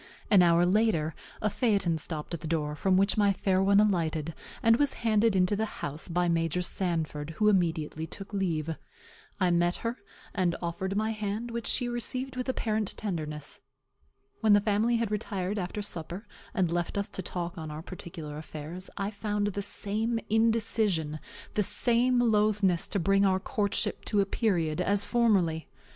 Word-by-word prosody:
An 200 -3 +8
hour 170 0 +5
after, 180 -5 +2 0.3
a 215 - +3
phaeton 195 -9 +1
stopped 155 +1 -5
at 170 - -3
the 155 - -6
door, 150 -2 -1
from 185 +4 +2
which 195 +2 +3
my 205 -1 +5
fair 190 0 +1
one 200 +1 +5
alighted, 165 -6 +1 0.3
and 230 0 +6
was 285 0 +2
handed 220 -1 +3
into 185 +2 +3
the 220 +2 -1
house 145 +3 -2
by 175 0 +1
Major 165 +1 +1
Sanford, 160 -4 -1
who 210 -1 +4
immediately 160 -4 0
took 195 +5 -9
leave. 165 -5 -1 0.6
I 185 -2 +3
met 175 0 +2
her, 230 +2 -1 0.4
and 180 -4 +1
offered 185 +3 -3
my 220 +1 +1
hand, 215 +2 -3
which 235 0 -3
she 245 - +3
received 255 +2 -2
with 255 +1 -3
apparent 215 -5 -1
tenderness. 155 -7 -4 0.8
When 220 -2 +4
the 205 - +7
family 215 +3 +2
had 230 -2 0
retired 205 -1 -2
after 190 +3 -3
supper, 175 +2 -5 0.3
and 185 -8 0
left 175 +3 -1
us 200 - -1
to - - -5
talk 175 -1 -4
on 160 -1 -6
our 150 +1 -6
particular 160 -4 -7
affairs, 160 +4 -7
I 200 +1 -2
found 205 -1 -1
the 200 0 -3
same 220 +4 -1
indecision, 220 -8 +1 0.3
the 210 - +2
same 245 +4 +2
loathness 210 -5 +2
to 200 - -1
bring 195 +3 +3
our 190 -1 +3
courtship 205 0 -1
to 210 - +1
a - - +2
period, 175 -8 0
as 205 +1 +1
formerly. 195 -10 +2
195 Hz, 170 wpm, -29 LUFS, 170-215 Hz, 0.8 s, An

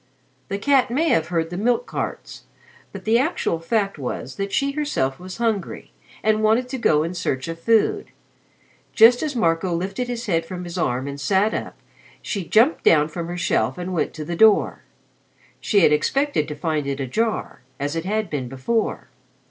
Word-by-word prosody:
The 200 - -3
cat 270 +4 +3
may 310 +7 +1
have 160 - +2
heard 165 -1 -1
the 175 - -4
milk 240 - +1
carts, - - -6 0.5
but - - -9
the 225 +2 +4
actual 265 - 0
fact 200 0 -1
was 130 0 -5
that 195 0 -3
she 275 0 +1
herself 275 - -1
was 185 +1 -8
hungry 225 -5 -2 0.3
and 215 0 +2
wanted 220 +4 +2
to 265 0 -4
go 150 -9 +3
in 165 +2 -3
search 130 -6 -2
of 165 0 -5
food. 230 - +2 0.9
Just 240 +1 +7
as 300 -3 -2
Marco 170 -4 +1
lifted 195 +8 -3
his 240 -1 -4
head 165 -6 +1
from 180 +2 -7
his 175 0 -7
arm 130 -6 -1
and 140 0 -6
sat 200 +7 +2
up, - - -5 0.4
she 200 -4 -4
jumped 225 - +3
down 150 -2 +4
from 165 +1 -5
her 175 +1 -5
shelf 180 - 0
and 180 +1 -4
went 170 - -1
to 155 - -6
the 170 - -4
door. 215 +3 +4 0.8
She 205 -3 +2
had 155 - +5
expected 275 - +1
to 150 - -5
find 150 -2 -2
it 140 0 -3
ajar 215 - -2 0.2
as 145 +3 -2
it 165 +1 -3
had 215 +2 -1
been 130 -5 -4
before. 135 - -2
185 Hz, 190 wpm, -22 LUFS, 160-230 Hz, 0.9 s, Just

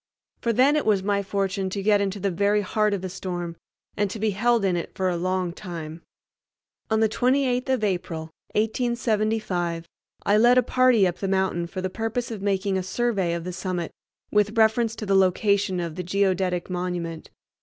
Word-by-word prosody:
For 235 - +1
then 260 +6 +4
it 300 - 0
was 200 -3 +3
my 200 0 +1
fortune 195 -1 -1
to 195 +1 -4
get 205 0 +4
into 200 0 -2
the 195 0 0
very 200 +3 +2
heart 210 +1 +1
of 190 - -6
a - - -2
storm, 175 -2 -5 0.4
and 205 -1 0
to 210 - -5
be 215 0 0
held 230 +2 +2
in 185 -2 +2
it 170 - -3
for 185 -1 0
a 180 - -1
long 185 0 -1
time. 170 -4 -7 0.9
On 220 0 +2
the 220 - +5
28th 250 +3 +1
of 260 -4 +1
April 180 -5 -1 0.3
1875 215 -6 0 0.4
I 205 - +4
led 240 +2 +6
a 250 - +5
party 255 -4 +4
up 180 -1 -1
the 195 - -2
mountain 190 -3 0
for 185 +2 -5
the 185 - -2
purpose 225 +3 -3
of 215 -3 -5
making 195 -1 0
a - - -1
survey 190 -3 0
of 170 - -4
the 180 +1 -5
summit 180 -2 -3 0.4
with 210 +1 +2
reference 225 +1 +3
to 215 - -6
the 195 - +1
location 195 0 +2
of 170 -2 -3
the 180 - -4
Geodetic 185 -1 0
monument. 175 -3 -4
195 Hz, 195 wpm, -25 LUFS, 180-220 Hz, 0.9 s, led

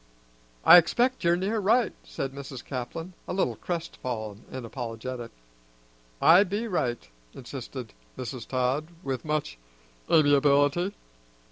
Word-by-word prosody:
"I - - +11
expect 245 +9 +2
you're 170 0 +4
near 200 +5 -1
right," 225 +3 +3
said 135 -1 -5
Mrs. 135 -2 -8
Caplin, 145 +7 -5
a - - -3
little 190 - 0
crestfallen 120 - -5
and 130 -2 -6
apologetic. 120 0 -6 0.9
"I 175 +4 +7
be 205 +4 -3
right," 125 - -1 0.3
insisted - - -8 0.2
Mrs. 125 -2 -6
Todd 130 +4 0 0.2
with 130 -2 -3
much 150 - -2 0.5
amiability. 145 +4 +4
145 Hz, 115 wpm, -27 LUFS, 125-180 Hz, 0.9 s, I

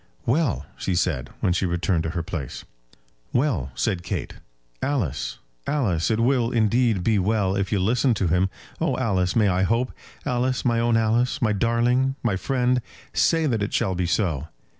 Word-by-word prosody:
"Well!" 135 0 +1
she 95 - -1
said, 85 -7 0
when 90 - +2
she 90 +1 0
returned 85 0 0
to - - -1
her 85 - -1
place. 80 -5 -6 0.7
"Well," 120 - +1
said 90 - 0
Kate. 90 - -4 0.5
"Alice, 105 - -1 0.3
Alice, 105 - +1
it 110 -1 +1
will, 120 0 +2
indeed, 115 -3 +2
be 105 +1 +2
well 100 -1 +1
if 100 0 -1
you 105 - +2
listen 115 +5 +2
to 95 -3 0
him. 90 +3 +2 0.3
Oh, - - 0
Alice, 95 -7 0
may 110 -3 +4
I 90 -1 +2
hope? 115 +6 +1 0.3
Alice, 125 +1 0
my 120 -1 +2
own 115 0 +3
Alice, 120 +4 +1
my 115 -6 +2
darling, 120 +5 +2
my 110 -5 +1
friend! 125 +3 +1 0.3
Say 165 -1 +3
that 115 -7 0
it 100 - -2
shall 95 - +1
be 90 -1 -1
so." 85 -5 0
110 Hz, 175 wpm, -24 LUFS, 90-125 Hz, 0.7 s, may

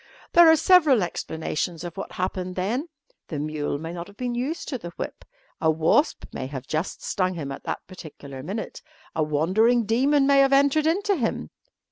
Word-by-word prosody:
There 340 -1 +8
are 320 - +8
several 305 - +5
explanations 165 0 -3
of 175 -1 -6
what 195 - -6
happened 185 0 -3
then. 230 - -1 0.4
The 155 - -5
mule 150 -1 -2
may 165 +3 -6
not 170 0 -6
have 200 0 -16
been 250 -1 -2
used 265 +8 -3
to 260 -4 -3
the 175 - -7
whip; - - -6 0.4
a 160 - +3
wasp 160 - +2
may 130 - -4
have 135 -2 -7
just 155 +5 -3
stung 185 -1 -1
him 145 -4 -5
at - - -8
that - - -4
particular 145 -7 -10
minute; 200 +10 -5 0.3
a 160 - 0
wandering 190 +11 +2
demon 275 +6 +3
may 280 0 +5
have 275 0 +4
entered 285 +3 +4
into 400 +5 +1
him. 240 -9 -2
190 Hz, 185 wpm, -25 LUFS, -, 0.4 s, There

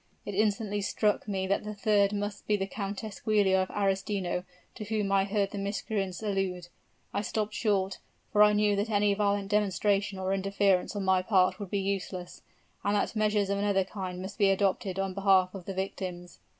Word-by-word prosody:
It 205 - -4
instantly 205 0 0
struck 210 +1 0
me 190 -2 -1
that 195 +1 0
the 210 0 -6
third 205 0 +3
must 205 0 -4
be 210 - +3
the 195 - -1
Countess 200 +1 -5
Giulia 205 -3 +3
of 185 - -2
Arestino 195 -2 -1 0.3
to 220 - -7
whom 210 -2 -1
I 195 0 +3
heard 200 -1 0
the 205 - -4
miscreants 200 -1 -3
allude. 190 -4 -2 0.4
I 200 - 0
stopped 215 0 -2
short 200 -3 0 0.3
for 210 - +4
I 210 0 +7
knew 210 0 +3
that 205 +3 -1
any 205 -1 +3
violent 200 -1 0
demonstration 205 -1 +1
or 190 0 -1
interference 195 0 +1
on 200 - -2
my 190 -1 +4
part 185 0 +2
would 200 -3 -6
be 200 - -1
useless, 190 -2 -3 0.4
and 205 +1 +1
that 205 - 0
measures 210 -2 +1
of 200 - 0
another 200 -1 +2
kind 185 -1 -6
must 195 +3 -8
be 200 -2 +5
adopted 195 -1 +1
on 195 -1 -1
behalf 190 -1 +3
of 190 -3 -8
the 195 - -4
victims. 185 -2 -5
200 Hz, 190 wpm, -29 LUFS, 190-205 Hz, 0.4 s, I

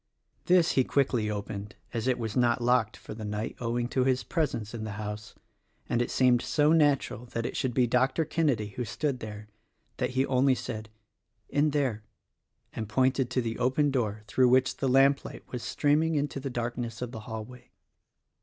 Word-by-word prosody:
This 175 -2 +4
he 130 - +3
quickly 125 -6 +1
opened 100 0 -5 0.2
(as 115 0 -2
it 130 - +2
was 110 -3 -4
not 120 -1 +3
locked 120 -3 +2
for - - -9
the 110 0 -8
night, 105 +1 -3
owing 120 0 -1
to 130 - +1
his 130 0 +1
presence 130 - -2
in 115 -2 -5
the 110 -2 -4
house), 105 +1 -6 0.5
and 120 - +1
it 120 - -1
seemed 125 -2 +3
so 150 0 +2
natural 145 -6 +2
that 115 -1 -3
it - - -4
should 130 -3 -1
be 125 - +4
Dr. 130 +6 +2
Kenedy 140 -10 0
who 125 +5 -4
stood 135 +3 -2
there 105 -1 -8 0.5
that - - 0
he 135 - +4
only 130 0 +3
said 110 -3 -6 0.6
"In 145 +2 +2
there" 135 -7 -1 0.7
and 110 -2 -5
pointed 130 +1 +2
to 125 - 0
the 115 0 -3
open 135 +4 +2
door 110 -5 -1
through 125 +3 +3
which 130 +1 +3
the 135 - 0
lamplight 135 +2 +3
was 125 - -4
streaming 155 +5 +1
into 145 -1 -1
the 135 0 -4
dark 120 0 -3
ness 120 0 -4
of 120 - -5
the 115 - -7
hallway. 110 +3 -8
125 Hz, 190 wpm, -28 LUFS, 110-135 Hz, 0.7 s, This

